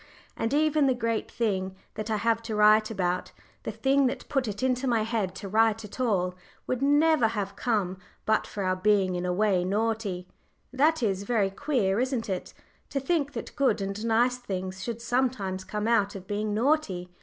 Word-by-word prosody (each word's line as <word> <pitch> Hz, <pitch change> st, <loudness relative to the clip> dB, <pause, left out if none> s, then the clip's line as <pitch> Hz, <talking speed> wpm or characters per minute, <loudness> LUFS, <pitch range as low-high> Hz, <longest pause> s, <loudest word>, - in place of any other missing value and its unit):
And 225 Hz, -, -2 dB
even 305 Hz, 0 st, +3 dB
the 260 Hz, -, +3 dB
great 230 Hz, -2 st, -1 dB
thing 190 Hz, -5 st, -1 dB, 0.2 s
that 215 Hz, 0 st, -5 dB
I 215 Hz, -, +1 dB
have 230 Hz, +2 st, +1 dB
to 225 Hz, -1 st, -4 dB
write 215 Hz, +1 st, +5 dB
about, 180 Hz, -4 st, -1 dB, 0.3 s
the -, -, -4 dB
thing 265 Hz, +5 st, +2 dB
that 250 Hz, -, -4 dB
put 270 Hz, -4 st, 0 dB
it 210 Hz, +3 st, -4 dB
into 260 Hz, 0 st, +1 dB
my 230 Hz, -3 st, +2 dB
head 215 Hz, -5 st, -2 dB
to 200 Hz, -, -6 dB
write 220 Hz, +1 st, +2 dB
at 210 Hz, -, -11 dB
all, 190 Hz, -7 st, +1 dB, 0.3 s
would 255 Hz, 0 st, -2 dB
never 290 Hz, -2 st, +4 dB
have 205 Hz, -3 st, -3 dB
come 200 Hz, -6 st, -1 dB, 0.3 s
but 220 Hz, 0 st, +2 dB
for 200 Hz, -, -4 dB
our 185 Hz, 0 st, +1 dB
being 195 Hz, -1 st, +2 dB
in 180 Hz, 0 st, -2 dB
a -, -, +1 dB
way 190 Hz, -1 st, +2 dB
naughty 205 Hz, -2 st, -1 dB, 0.5 s
that 300 Hz, +2 st, +3 dB
is 195 Hz, -3 st, +1 dB
very 200 Hz, -2 st, +1 dB
queer, 215 Hz, -4 st, 0 dB
isn't 255 Hz, -3 st, -1 dB
it? 185 Hz, -2 st, -3 dB, 0.4 s
To 275 Hz, -, -1 dB
think 290 Hz, 0 st, 0 dB
that -, -, -6 dB
good 260 Hz, -6 st, +2 dB
and 195 Hz, +2 st, -4 dB
nice 235 Hz, +2 st, +2 dB
things 190 Hz, -4 st, -5 dB
should 235 Hz, -1 st, -5 dB
sometimes 235 Hz, -7 st, 0 dB
come 210 Hz, +2 st, -3 dB
out 205 Hz, -4 st, +2 dB
of 190 Hz, -1 st, -8 dB
being 210 Hz, +2 st, -2 dB
naughty! 220 Hz, -, 0 dB
220 Hz, 190 wpm, -27 LUFS, 195-250 Hz, 0.5 s, write